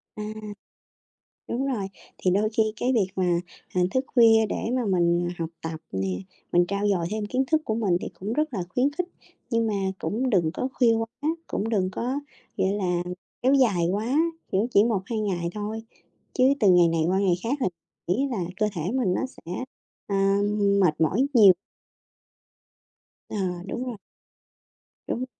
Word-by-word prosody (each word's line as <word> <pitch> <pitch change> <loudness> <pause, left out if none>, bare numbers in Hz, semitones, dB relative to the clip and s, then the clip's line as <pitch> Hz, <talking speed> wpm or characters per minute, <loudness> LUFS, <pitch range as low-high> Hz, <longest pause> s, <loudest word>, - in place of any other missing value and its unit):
À, 210 - -5 1.3
đúng 265 +3 -1
rồi, 230 -8 -1 0.3
thì 185 - +1
đôi 205 +3 +2
khi 220 - +5
cái 250 +3 0
việc 220 -6 +3
mà, 175 -2 +2 0.3
à, 180 - +2
thức 260 +6 0
khuya 225 -2 +6
để 225 - -2
mà 250 - 0
mình, 175 -2 +2
à, - - -6
học 165 -1 -3
tập 160 0 -5
nè, 95 0 -1 0.4
mình 175 0 +5
trau 200 +1 0
dồi 180 -4 +1
thêm 215 0 -2
kiến 255 +5 0
thức 315 +1 +2
của 220 - -1
mình 205 -6 +1
thì - - -4
cũng 205 +4 -3
rất 300 +1 0
là 195 - -1
khuyến 255 +9 +1
khích, 360 +4 -2 0.4
nhưng 230 -1 +2
mà 220 - 0 0.3
cũng 255 +4 -1
đừng 175 -7 +3
có 255 - -1
khuya 235 -3 +4
quá, 225 0 0 0.4
cũng 215 - -2
đừng 195 -5 +1
có, 255 +8 -2 0.4
gọi 190 - +1
là, 180 -4 0 0.4
kéo 260 +2 +4
dài 210 -11 +3
quá, 225 +7 0 0.4
kiểu, 195 +4 +2
chỉ 200 - +7
1-2 220 0 -1
ngày 180 -5 -1
thôi, 215 +1 -4 0.5
chứ 255 - +3 0.2
từ 210 - +5
ngày 175 -1 +6
này 165 -1 +1
qua 185 +2 +2
ngày 195 -3 +3
khác 255 +6 -1
thì - - +2
m 180 0 -6
nghĩ 270 +9 +1
là 235 - -2 0.2
cơ 215 - +2
thể 165 - -3
mình 245 -9 +1
nó - - 0
sẽ, 180 -9 -10 0.5
à, 195 0 +2 0.4
mệt 165 -5 +2
mỏi 190 - +3
nhiều. 205 -6 +9 1.8
Ờ, - - -5 0.3
đúng 245 +5 -3
rồi. 245 -4 -5 1.1
Đúng. 250 - -2
210 Hz, 180 wpm, -26 LUFS, 180-240 Hz, 1.8 s, nhiều